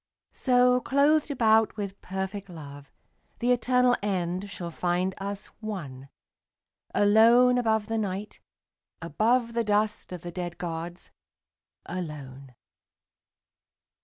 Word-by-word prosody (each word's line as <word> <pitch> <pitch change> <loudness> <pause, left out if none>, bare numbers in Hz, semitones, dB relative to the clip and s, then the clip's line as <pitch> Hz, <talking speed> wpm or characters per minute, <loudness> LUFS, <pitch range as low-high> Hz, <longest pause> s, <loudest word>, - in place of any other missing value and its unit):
So, 250 -1 +3
clothed 290 +4 +3
about 225 -5 +3
with 200 -2 -5
perfect 190 +1 -5
love, 145 -4 -11 0.5
The 245 +1 +1
eternal 250 0 +3
end 185 -1 -2
shall 175 -4 -6
find 180 +2 -1
us 200 +1 -5
one, 150 - -7 0.9
Alone 235 +4 +5
above 220 -3 +1
the 225 +1 -2
Night, 200 0 -4 0.6
above 230 - +1
The 235 0 +1
dust 210 -1 0
of 180 -2 -6
the 175 - -7
dead 175 -1 -5
gods, 170 +1 -6 0.7
alone. 140 -7 -7
200 Hz, 105 wpm, -27 LUFS, 175-230 Hz, 0.9 s, Alone